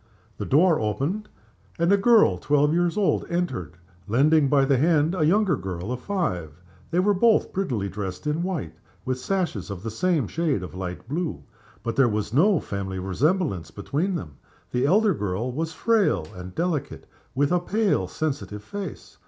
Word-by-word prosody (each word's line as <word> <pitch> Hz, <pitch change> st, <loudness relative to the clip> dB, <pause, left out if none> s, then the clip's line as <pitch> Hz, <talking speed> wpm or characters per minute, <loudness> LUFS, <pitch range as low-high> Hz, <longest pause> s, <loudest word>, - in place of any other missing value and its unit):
The -, -, -3 dB
door 160 Hz, +3 st, +4 dB
opened, 140 Hz, -, -2 dB, 0.5 s
and 170 Hz, +2 st, +2 dB
a -, -, +7 dB
girl 220 Hz, +2 st, +4 dB
twelve 145 Hz, +1 st, +2 dB
years 175 Hz, +2 st, +1 dB
old 205 Hz, -3 st, +2 dB
entered, 130 Hz, -, -2 dB, 0.3 s
lending 140 Hz, +6 st, +4 dB
by 140 Hz, -1 st, +4 dB
the 135 Hz, -1 st, +3 dB
hand 160 Hz, +1 st, +3 dB
a 180 Hz, -4 st, 0 dB
younger 200 Hz, +2 st, +3 dB
girl 90 Hz, +3 st, -5 dB
of 125 Hz, -, -3 dB
five. 90 Hz, -, -3 dB, 0.3 s
They 175 Hz, -, +1 dB
were 205 Hz, +3 st, +3 dB
both 220 Hz, +3 st, +3 dB
prettily 125 Hz, -, -1 dB
dressed 95 Hz, -1 st, -5 dB
in 150 Hz, +2 st, 0 dB
white, 170 Hz, -, -3 dB, 0.3 s
with 130 Hz, 0 st, -1 dB
sashes 160 Hz, -, -2 dB
of 100 Hz, -1 st, -6 dB
the 115 Hz, -, -4 dB
same 155 Hz, -, +1 dB
shade 155 Hz, -, -1 dB
of 90 Hz, -, -8 dB
light 90 Hz, +2 st, -6 dB
blue. 135 Hz, -, -3 dB, 0.4 s
But 115 Hz, -, -2 dB
there 135 Hz, -3 st, +5 dB
was 105 Hz, 0 st, -2 dB
no 180 Hz, +6 st, +4 dB
family 95 Hz, -1 st, -4 dB
resemblance 105 Hz, -, 0 dB
between 160 Hz, -, -2 dB
them. 75 Hz, -, -6 dB, 0.3 s
The 125 Hz, +2 st, +1 dB
elder 205 Hz, +4 st, +4 dB
girl 105 Hz, +5 st, -2 dB
was 160 Hz, +5 st, -3 dB
frail 215 Hz, -, +2 dB
and 90 Hz, 0 st, -9 dB
delicate, 165 Hz, -5 st, -2 dB, 0.3 s
with 145 Hz, +3 st, +2 dB
a 180 Hz, -, +3 dB
pale, 210 Hz, +4 st, 0 dB
sensitive 135 Hz, -9 st, -4 dB
face. 190 Hz, -, -8 dB
145 Hz, 170 wpm, -25 LUFS, -, 0.5 s, a